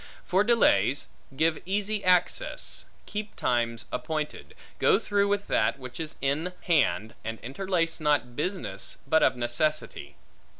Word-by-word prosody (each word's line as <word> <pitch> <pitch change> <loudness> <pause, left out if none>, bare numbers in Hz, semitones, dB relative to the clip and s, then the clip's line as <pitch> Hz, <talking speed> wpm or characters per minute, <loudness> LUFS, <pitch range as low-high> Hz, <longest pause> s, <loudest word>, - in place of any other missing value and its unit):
For 190 +3 +3
delays: 140 - +3 0.3
give 160 +1 +2
easy 205 +2 -1
access; 180 - +1 0.2
keep 210 0 -5
times 115 -1 0
appointed; 155 -1 -4 0.2
go - - +5
through 200 -1 +1
with 200 0 0
that 110 - +1
which 130 0 -9
is 160 -2 -5
in 150 +6 0
hand, 110 - +2
and 115 0 -4
interlace 165 +5 -1
not 145 -6 +1
business, 150 - -3
but 160 +3 +3
of - - +4
necessity. 125 +6 -1
155 Hz, 130 wpm, -28 LUFS, 125-190 Hz, 0.3 s, go